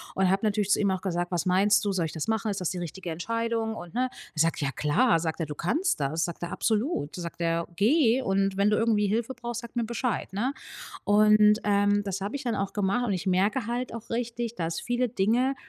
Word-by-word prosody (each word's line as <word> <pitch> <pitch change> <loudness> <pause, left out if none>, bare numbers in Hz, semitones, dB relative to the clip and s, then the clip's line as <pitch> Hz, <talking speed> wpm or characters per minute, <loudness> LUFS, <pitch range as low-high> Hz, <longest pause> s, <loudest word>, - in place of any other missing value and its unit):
und 190 -1 +2
habe 195 +3 +1
natürlich 210 -1 0
zu - - +4
ihm 200 -2 +2
auch 190 -1 -2
gesagt: 175 -2 -2
„Was 175 0 -1
meinst 195 +4 +4
du? 205 - +1
Soll 180 -3 0
ich 155 - -4
das 160 - -4
machen? 220 -1 0
Ist 195 - -4
das 180 - 0
die 185 - -4
richtige 175 +1 -6
Entscheidung?“ 230 +6 -2
Und 175 -5 -9
ne, 255 +1 +1
er 160 - -11
sagt: 165 -1 +1
„Ja 140 -2 0
klar“, 165 - +2
sagt 160 0 -3
er. 165 - -1
„Du 150 - -6
kannst 305 - 0
das“, 150 +4 0
sagt 170 0 -6
er. 175 - -4
„Absolut“, 220 - -1
sagt 170 -1 -6
er, 165 0 0
„geh 245 - +3
und 195 -3 0
wenn 200 +1 +3
du 210 - +2
irgendwie 220 -2 +2
Hilfe 230 +5 -1
brauchst, 240 -2 -5
sag 235 0 -11
mir 235 -1 0
Bescheid, 235 0 -2
ne?“ 240 +8 -1 0.5
Und, 210 +1 +5
ähm, 205 0 +3
das 195 -1 -3
habe 205 +7 -3
ich 280 - -7
dann 240 -2 0
auch 195 -1 -2
gemacht 205 +5 0
und 210 - 0
ich 185 0 -3
merke 200 +6 +1
halt 240 +1 -3
auch 230 -1 -8
richtig, 235 0 -3
dass 165 -4 -3
viele 245 +1 0
Dinge, 235 +5 +1
205 Hz, 240 wpm, -27 LUFS, 180-230 Hz, 0.5 s, Und